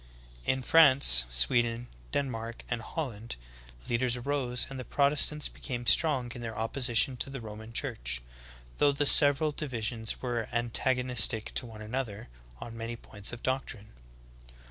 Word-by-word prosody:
In 130 0 0
France, 130 - +6
Sweden, 115 - +1 0.2
Denmark, 115 -4 -4
and 120 -2 -3
Holland, 115 -5 -6 0.5
leaders 120 +1 0
arose 125 -1 -1
and 135 -1 -8
the - - -5
Protestants 145 +3 +1
became 120 -3 -7
strong 130 -4 +1
in 120 - -9
their 115 -2 -6
opposition 120 +2 0
to 130 - -3
the 135 0 -7
Roman 110 0 -10
Church, - - -3 0.6
though 145 - +4
the 145 +1 -1
several 145 +2 +7
divisions 115 -6 -3
were 120 -3 -4
antagonistic 120 -1 +2
to 125 - 0
one 110 -2 -11
anoth 125 +3 -3
er 100 +1 -11 0.3
on 115 -1 -9
many 115 +1 -6
points 105 -3 -3
of 120 0 -9
doctrine. 130 -5 -4
120 Hz, 145 wpm, -29 LUFS, 115-135 Hz, 0.6 s, several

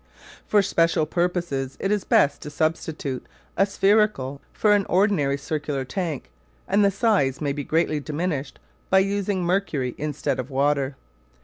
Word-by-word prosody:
For 205 -1 +4
special 165 -4 +2
purposes 170 -7 -1
it 195 - -1
is 210 -2 0
best 140 0 +3
to - - -6
substitute 155 -3 -2 0.3
a 195 - +3
spherical 195 -9 +2
for 210 -1 +3
an 205 -1 +2
ordinary 175 -8 +2
circular 145 -1 -3
tank 155 - -4 0.4
and 205 +1 +3
the 200 - +5
size 195 - +1
may 145 -2 -1
be 145 0 -4
greatly 155 0 +1
diminished 150 -1 -3 0.3
by 190 - +5
using 195 -1 +1
mercury 170 -9 0
instead 150 -3 -2
of 130 +1 -4
water. 140 0 +1
160 Hz, 145 wpm, -24 LUFS, 140-195 Hz, 0.4 s, the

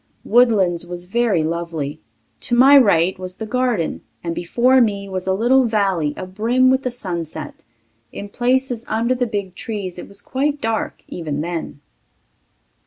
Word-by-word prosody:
Woodlands 195 -8 +3
was 175 0 -6
very 205 -4 +1
lovely; 165 -3 -3 0.4
to 240 - 0
my 270 +4 +7
right 190 -8 +4
was 185 0 -3
the 220 - -6
garden, 245 -6 -1 0.2
and 170 -1 -2
before 245 +10 +3
me 200 -3 0
was 190 -1 -5
a 190 - +2
little 250 +5 +3
valley 195 -9 0
abrim 230 +8 +1
with 260 0 +2
the 255 - -2
sunset. 170 - -6 0.5
In 205 - -7
places 245 +2 0
under 230 +3 +1
the 250 -1 -1
big 200 -4 -4
trees 190 -3 -5
it - - -8
was 200 - -8
quite 285 +6 -2
dark 225 -2 -3
even 150 -4 -4
then. 165 -3 -5
205 Hz, 155 wpm, -20 LUFS, 175-245 Hz, 0.5 s, my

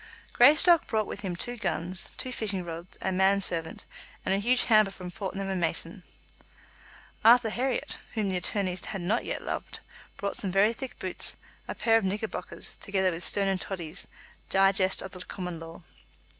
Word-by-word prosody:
Greystock 305 +6 +6
brought 220 -4 0
with - - -7
him 190 -4 -4
two 245 +7 -5
guns, 185 -3 -3
two 255 - -3
fishing 200 -6 -3
rods, 170 +1 -7
a 190 - 0
man 190 +2 +3
servant, 165 -4 +6 0.4
and - - +1
a 195 - +1
huge 245 +4 +2
hamper 215 -3 +4
from 180 -2 -9
Fortnum 195 -1 -5
and 190 -2 -2
Mason's. 165 +2 -2 1.2
Arthur 230 0 +6
Herriot, 255 +2 -2 0.2
whom 215 -2 0
the 190 - +1
attorneys 185 -1 -2
had 195 - -5
not 205 +7 -1
yet - - -4
loved, - - -5 0.4
brought 200 0 -3
some 195 - -1
very 200 +4 +3
thick 260 +2 -8
boots, 185 -1 -1 0.3
a - - -5
pair 225 -1 +3
of - - -7
knickerbockers, 205 +3 -5
together 190 -2 0
with 170 +1 -5
Stone 200 +2 +2
and 190 -1 -1
Toddy's 175 -3 -5 0.4
"Digest 195 0 +3
of 190 - -8
the 185 -1 -7
Common 180 -3 -6
Law." 165 +1 -11
195 Hz, 175 wpm, -28 LUFS, 180-220 Hz, 1.2 s, Greystock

